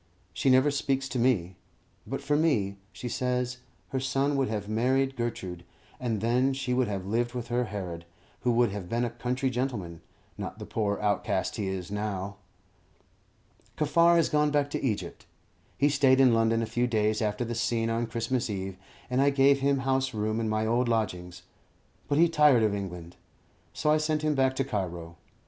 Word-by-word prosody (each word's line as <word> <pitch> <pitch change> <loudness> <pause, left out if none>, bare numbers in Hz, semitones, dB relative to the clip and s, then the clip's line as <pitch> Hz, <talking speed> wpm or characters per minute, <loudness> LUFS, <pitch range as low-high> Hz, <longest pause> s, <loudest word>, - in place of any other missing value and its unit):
She 135 - +1
never 130 +3 +5
speaks 135 -1 -1
to 125 - -2
me. 95 -8 +1 0.5
But 135 +4 -4
for 145 +1 +1
me, 115 -11 +1
she 120 - -7
says, 125 0 -1 0.3
her 130 - -1
son 135 +2 0
would 135 -1 +1
have 105 -2 -3
married 130 +5 +1
Gertrude, 95 -8 -4 0.4
and 115 -5 -2
then 125 +4 +2
she 130 -2 -2
would 125 -1 +2
have 100 -3 -4
lived 120 +4 -1
with 120 -1 -5
her 120 +1 +1
Herod, 90 -6 -6 0.3
who 125 - +1
would 120 -2 +3
have 100 -3 -6
been 120 +1 0
a 120 - -3
country 125 +3 -2
gentleman, 110 -10 -3 0.4
not - - -5
the - - -7
poor 105 -2 -1
outcast 105 -2 0
he 100 - -2
is 95 -1 -4
now. 100 -1 -3 1.4
Kaffar 170 +3 +4
has 165 -2 +4
gone 150 0 +2
back 145 -1 0
to - - -3
Egypt. 110 -6 -3 0.5
He 145 - +4
stayed 135 -2 +4
in 130 -3 +6
London 115 0 +2
a - - 0
few 120 +3 0
days 110 -2 +1
after 105 +2 -1
the 120 - -3
scene 115 -1 0
on 115 +1 -1
Christmas 115 +2 -2
Eve, 95 -2 -4 0.3
and 125 +1 +1
I 140 - +5
gave 140 0 +4
him 135 0 +1
house 130 -2 0
room 110 +1 -1
in 110 -1 -1
my 110 0 0
old 120 +2 +1
lodgings; 90 -6 -2 0.6
but 145 - +1
he 170 +2 +6
tired 150 -7 +5
of 105 -2 +2
England, 90 -4 -6 0.5
so 150 - 0
I 155 - +5
sent 155 0 -1
him 155 -1 +2
back 130 -1 +2
to 135 - +1
Cairo. 90 -8 -4
120 Hz, 190 wpm, -28 LUFS, 105-135 Hz, 1.4 s, in